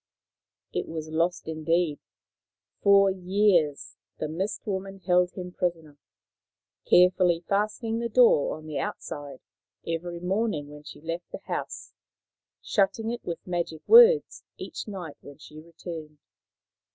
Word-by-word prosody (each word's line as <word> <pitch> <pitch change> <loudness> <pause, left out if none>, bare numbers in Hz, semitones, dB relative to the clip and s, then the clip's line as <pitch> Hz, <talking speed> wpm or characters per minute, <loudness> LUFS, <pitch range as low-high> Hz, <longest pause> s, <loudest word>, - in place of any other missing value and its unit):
It - - -2
was 160 -1 -6
lost 165 +2 -1
indeed. 160 0 0 0.8
For 200 -1 +5
years 185 -5 +1 0.2
the 155 - -3
Mist 185 +7 -4
woman 195 -1 -4
held 180 -1 +3
him 180 -1 -7
prisoner, 165 -5 -3 0.9
carefully 180 -1 +5
fastening 215 +3 -1
the 235 0 -2
door 230 - +4
on 155 - -13
the 155 -2 -4
outside 145 -2 -6 0.4
every 170 +1 -4
morning 185 -4 -1
when 150 0 -11
she 150 - -12
left 165 +2 -6
the - - -7
house, - - -5 0.7
shutting 215 +2 0
it 240 - -6
with 170 -2 -6
magic 170 -3 -3
words 470 0 +6
each - - -7
night 180 -7 -7
when 145 - -13
she 150 0 -12
returned. 160 -2 -9
175 Hz, 125 wpm, -26 LUFS, 155-195 Hz, 0.9 s, words